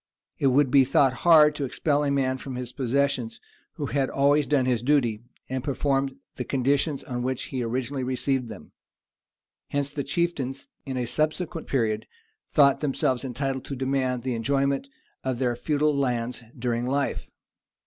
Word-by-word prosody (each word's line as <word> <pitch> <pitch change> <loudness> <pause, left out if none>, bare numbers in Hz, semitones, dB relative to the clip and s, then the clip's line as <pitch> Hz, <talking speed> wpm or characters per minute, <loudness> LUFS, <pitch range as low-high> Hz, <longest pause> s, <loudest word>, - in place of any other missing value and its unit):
It 140 - +3
would 135 0 +3
be 135 0 +7
thought 135 0 +3 0.2
hard 150 -2 +8
to 145 - -4
expel 145 +2 0
a 145 - +1
man 130 -2 +1
from 130 -1 -6
his 125 -1 -4
possessions 130 -3 -1 0.3
who 150 - -4
had 135 -1 0
always 140 +1 +3
done 135 -2 +2
his 125 -3 +1
duty, 120 -5 +2 0.3
and 130 -1 -3
performed 135 -1 0 0.2
the 125 - -2
conditions 140 +3 0
on 125 -1 -4
which 130 0 -2
he 130 - -1
originally 130 +3 -2
received 130 -1 -1
them: 105 -4 -10 1.0
hence 140 0 -2
the 145 -1 -3
chieftains, 140 -3 -2 0.2
in 130 -1 -3
a 125 - -1
subsequent 155 +5 -1
period, 110 -5 0 0.4
thought 140 -3 +5
themselves 130 -3 0
entitled 135 +1 -3
to 140 - -5
demand 130 -1 -1
the 130 -1 -1
enjoyment 140 - 0 0.3
of 130 -2 -1
their 120 -1 0
feudal 150 +3 +1
lands 125 -3 -1
during 120 0 -1
life. 140 +1 -1
135 Hz, 160 wpm, -26 LUFS, 125-140 Hz, 1.0 s, hard